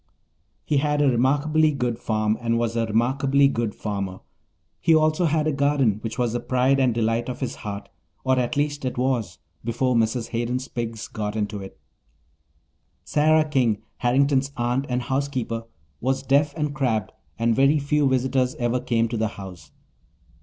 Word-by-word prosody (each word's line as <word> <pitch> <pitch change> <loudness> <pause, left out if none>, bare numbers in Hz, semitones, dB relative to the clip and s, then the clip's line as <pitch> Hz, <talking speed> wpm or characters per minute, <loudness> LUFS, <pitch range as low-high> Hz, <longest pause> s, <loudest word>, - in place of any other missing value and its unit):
He 150 - +1
had 150 +1 +1
a 145 - +4
remarkably 145 +5 +3
good 125 -5 -2
farm 110 -1 0
and 115 -1 +1
was 115 -1 -1
a 115 -1 0
remarkably 135 +5 +3
good 115 -5 -2
farmer. 100 -3 -4 0.6
He 165 - +4
also 155 +2 +3
had 155 -1 +1
a 155 - +2
garden 135 -6 +2
which 115 +3 -5
was 120 -3 0
the 120 - 0
pride 130 +3 +2
and 130 -2 +3
delight 115 +1 0
of 125 - -5
his 130 -2 -4
heart 100 -2 -6 0.4
or, 130 0 +2
at 125 +2 -1
least, 145 0 -1
it 125 -2 -3
was 120 -9 -1 0.3
before 120 +3 0
Mrs. 115 0 0
Hayden's 125 +3 -2
pigs 115 -2 -5
got 105 -1 -4
into 105 -1 -2
it. 95 - -11 1.2
Sarah 155 +1 +3
King, 120 -7 +1
Harrington's 135 +2 +2
aunt 125 +3 0
and 125 0 -1
housekeeper, 130 -4 -2 0.3
was 130 +1 -1
deaf 140 +2 +2
and 150 -2 -1
crabbed, 125 -8 -1 0.3
and 115 0 +2
very 135 +4 +4
few 145 0 +1
visitors 130 0 +1
ever 120 +1 0
came 115 -2 +1
to 115 0 -3
the 110 0 +1
house. 95 -5 -10
125 Hz, 165 wpm, -24 LUFS, 115-140 Hz, 1.2 s, a